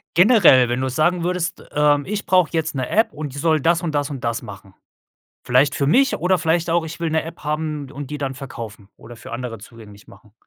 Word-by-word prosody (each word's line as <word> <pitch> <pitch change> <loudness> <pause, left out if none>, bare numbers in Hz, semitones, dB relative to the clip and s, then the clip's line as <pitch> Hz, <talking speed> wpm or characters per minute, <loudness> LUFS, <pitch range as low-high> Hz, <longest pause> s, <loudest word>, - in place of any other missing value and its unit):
Generell, 175 - +6
wenn 120 +1 -1
du 130 - -1
sagen 165 +7 +1
würdest: 180 -1 -2
„,Ähm, 145 -1 +2
ich 210 +1 -4
brauch 185 -3 +3
jetzt 160 -1 -2
'ne 130 -2 -3
App, 220 +2 +2
und 150 -3 -7
die - - -7
soll 155 0 +2
das 170 +3 +2
und 160 -3 -3
das 145 0 -1
und 135 -3 -7
das 115 0 -2
machen.“ 100 -3 -12 0.7
Vielleicht 130 +4 +3
für 140 - 0
mich 270 - +3
oder 180 +1 +1
vielleicht 165 0 0
auch: 170 -1 +1
„Ich 165 +1 -8
will 165 -1 -1
'ne 160 0 +1
App 165 +1 -10
haben 150 -2 -3
und 145 0 -8
die 150 - -4
dann 135 -2 -3
verkaufen 115 -7 -9
oder 120 0 -13
für - - -11
andere 120 -2 -5
zugänglich 105 -1 -14
machen.“ 105 +1 -18
150 Hz, 230 wpm, -21 LUFS, 125-165 Hz, 0.7 s, Generell